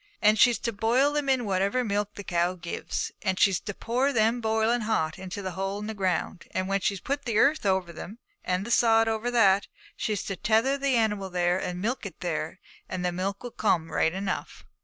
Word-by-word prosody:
And 215 0 +4
she's 240 +1 +6
to 230 - -3
boil 240 +7 +2
them 295 -2 -1
in 260 -3 +2
whatever 200 +5 +1
milk 205 -2 -2
the 205 - -7
cow 175 0 0
gives, 170 -1 -4
and 190 -2 0
she's 195 -3 +4
to 205 - -6
pour 255 +4 0
them 230 0 +2
boiling 220 +2 +1
hot 185 -7 -1
into 190 +1 -6
a 185 - -2
hole 195 +2 -3
in 210 - -5
the 220 - -4
ground; 185 -3 -2
and 185 0 0
when 195 0 +1
she's 195 0 -1
put 285 +6 -3
the 230 -3 0
earth 280 -1 +3
over 190 -3 0
them, 195 +6 -8 0.3
and 185 +2 -1
the 235 - -5
sod 225 -1 +4
over 225 +2 -1
that, 200 -5 +4 0.3
she's 210 -3 -2
to 195 - -4
tether 225 +8 +2
the 275 -2 +1
animal 210 -4 0
there, 180 0 +1
and 180 0 -4
milk 245 +5 -1
it 180 - -13
there, 170 +1 -3 0.3
and 180 -1 -3
the 180 - +1
milk 195 +4 -3
will 245 - -6
come 170 -8 0
right 160 - +1
enough.' 190 0 -4
205 Hz, 220 wpm, -27 LUFS, 185-230 Hz, 0.3 s, she's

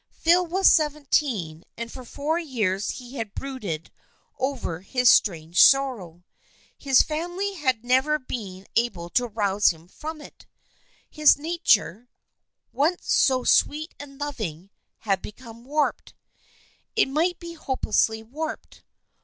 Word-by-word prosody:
Phil 345 +2 +3
was 380 +3 +2
seventeen, 275 - +1
and 230 0 -6
for 260 - -9
four 300 +6 -2
years 210 - -1
he 250 +1 -7
had 220 -3 -5
brooded 210 - -5 0.5
over 260 -11 -2
his 250 +6 +2
strange 170 -3 +3
sorrow. 225 -12 +2 0.5
His 270 -2 +4
family 350 +6 -3
had 260 - -1
never 265 +5 +3
been 200 -8 -7
able 180 -8 -1
to 245 +6 +1
rouse 205 -2 +1
him 165 0 -6
from 310 - -8
it. 295 - -15 0.6
His 305 -1 +4
nature, 270 - +1 0.6
once 320 +6 0
so 260 -2 +3
sweet 310 +6 +2
and 275 -1 -11
loving, 200 - -5 0.3
had 195 -3 0
become 230 +1 -11
warped 295 +2 -1 0.4
— - - -35
it 430 - +3
might 330 +6 0
be 340 0 -8
hopelessly 255 -7 0
warped. 305 +8 -7
255 Hz, 130 wpm, -24 LUFS, 205-300 Hz, 0.6 s, His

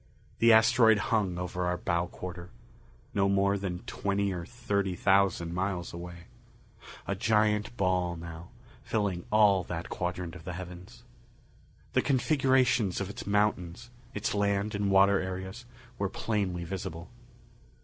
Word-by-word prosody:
The 115 0 +6
asteroid 110 0 +6 0.2
hung 95 -6 +1
over 90 0 -2
our 90 0 0
bow 85 -1 -1
quarter. 90 -1 -8 0.6
No 100 0 +2
more 100 0 +3
than 95 -3 -4
twenty 100 0 -1
or 85 -1 -5
thirty 100 -6 -1
thousand 95 -3 +2
miles 90 -1 -2
away. 85 0 -8 0.8
A - - -1
giant 105 +2 +1
ball 90 -2 +1
now, 85 +1 -9 0.3
filling 100 -5 -2
all 105 -3 +5
that 85 -1 -5
quadrant 90 -1 -3
of 85 - -11
the 90 - -5
heavens. 90 0 -9 0.9
The - - +4
configurations 130 - +2
of 100 0 -3
its - - -9
mountains, 105 +1 0 0.2
its 105 +2 -1
land 100 0 0
and 100 -1 0
water 100 0 +5
areas, 95 +5 -5 0.3
were 100 -1 0
plainly 95 -5 -2
visible. 90 -1 -6
95 Hz, 135 wpm, -29 LUFS, 90-105 Hz, 0.9 s, The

